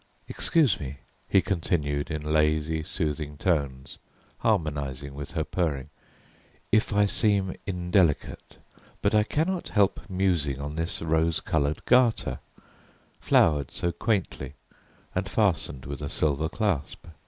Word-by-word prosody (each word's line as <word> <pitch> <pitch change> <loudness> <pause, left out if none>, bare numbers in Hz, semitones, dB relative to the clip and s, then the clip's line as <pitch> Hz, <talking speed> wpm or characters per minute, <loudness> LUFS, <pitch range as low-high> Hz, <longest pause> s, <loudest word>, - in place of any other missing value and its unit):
"Excuse 155 - +2
me," 70 -1 -6 0.3
he 95 - +4
continued 80 -7 -1
in 75 -2 -3
lazy 75 +1 +1
soothing 75 -1 -3
tones, 70 -6 -1 0.4
harmonizing 70 -3 -1
with 70 0 -7
her 80 - 0
purring, 75 -5 -2 0.8
"if 110 +1 +3
I 105 0 +4
seem 100 -2 +1
indelicate, 90 -4 0 0.5
but - - +2
I 105 - +5
cannot 165 - -1
help 100 -2 +2
musing 90 -8 0
on 75 +1 -5
this 80 0 -2
rose 80 0 +2
coloured 75 -1 -1
garter, 125 -2 +3 0.8
flowered 75 -4 +3
so 85 - -2
quaintly 85 - -2 0.6
and 95 +1 -2
fastened 85 - +1
with 70 0 -6
a - - -3
silver 75 +1 0
clasp. 95 -8 -2
80 Hz, 120 wpm, -27 LUFS, 70-95 Hz, 0.8 s, I